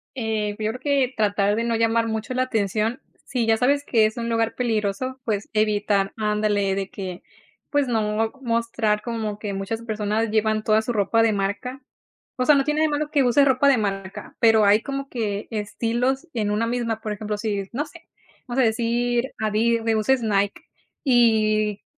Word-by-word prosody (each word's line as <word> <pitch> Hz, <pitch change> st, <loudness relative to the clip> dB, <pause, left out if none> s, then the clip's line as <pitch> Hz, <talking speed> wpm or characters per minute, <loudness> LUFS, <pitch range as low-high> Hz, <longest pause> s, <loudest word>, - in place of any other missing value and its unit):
Eh, 220 Hz, -4 st, -2 dB
pues 215 Hz, -, -4 dB
yo 215 Hz, -, +1 dB
creo 250 Hz, -, -8 dB
que, 275 Hz, -3 st, +1 dB
tratar 205 Hz, -1 st, +1 dB
de 230 Hz, -, -1 dB
no 235 Hz, 0 st, 0 dB
llamar 230 Hz, 0 st, +2 dB
mucho 220 Hz, +2 st, -3 dB
la 255 Hz, 0 st, +1 dB
atención, 220 Hz, 0 st, -1 dB, 0.2 s
si 245 Hz, -2 st, -1 dB
ya 225 Hz, 0 st, +3 dB
sabes 280 Hz, +5 st, +2 dB
que 225 Hz, -3 st, +3 dB
es 215 Hz, +2 st, -2 dB
un 235 Hz, 0 st, -3 dB
lugar 230 Hz, 0 st, 0 dB
peligroso, 235 Hz, +2 st, -1 dB
pues 210 Hz, -4 st, -2 dB
evitar 205 Hz, -2 st, +1 dB
andale, 210 Hz, -2 st, +1 dB
de 195 Hz, 0 st, -3 dB
que, 185 Hz, -2 st, -7 dB, 0.5 s
pues 290 Hz, -2 st, +1 dB
no 220 Hz, -1 st, 0 dB
mostrar 230 Hz, -3 st, 0 dB
como 220 Hz, -3 st, -3 dB
que 210 Hz, -1 st, -5 dB
muchas 195 Hz, +4 st, -4 dB
personas 215 Hz, 0 st, -1 dB
llevan 215 Hz, 0 st, +1 dB
toda 215 Hz, 0 st, +3 dB
su 220 Hz, -, -3 dB
ropa 220 Hz, +2 st, +2 dB
de 225 Hz, -1 st, +3 dB
marca. 205 Hz, +7 st, -3 dB, 0.6 s
O 255 Hz, -, 0 dB
sea, 300 Hz, -, +6 dB
no 275 Hz, -, +3 dB
tiene 300 Hz, +2 st, 0 dB
de 315 Hz, -, +4 dB
malo 300 Hz, 0 st, -2 dB
que 285 Hz, -3 st, +3 dB
use 255 Hz, +3 st, +4 dB
ropa 265 Hz, +1 st, +3 dB
de 275 Hz, -2 st, +5 dB
marca, 195 Hz, -3 st, -4 dB
pero 225 Hz, -2 st, +5 dB
hay 205 Hz, +2 st, +5 dB
como 275 Hz, 0 st, -5 dB
que, 210 Hz, -4 st, -3 dB
estilos 235 Hz, +6 st, -1 dB
en 215 Hz, -3 st, -1 dB
una 215 Hz, +2 st, +1 dB
misma, 230 Hz, -2 st, -2 dB
por 215 Hz, -, -4 dB
ejemplo, 210 Hz, 0 st, -4 dB
si, 205 Hz, -2 st, -3 dB
no 290 Hz, +5 st, -1 dB
sé, 330 Hz, +1 st, -16 dB, 0.4 s
vamos 250 Hz, +2 st, 0 dB
a -, -, +4 dB
decir, 235 Hz, +2 st, +1 dB
adi 220 Hz, +2 st, +1 dB
de 225 Hz, 0 st, 0 dB
uses 235 Hz, +4 st, +2 dB
Nike 205 Hz, +7 st, 0 dB, 0.4 s
y, 215 Hz, -5 st, +3 dB
225 Hz, 190 wpm, -23 LUFS, 210-245 Hz, 0.6 s, sea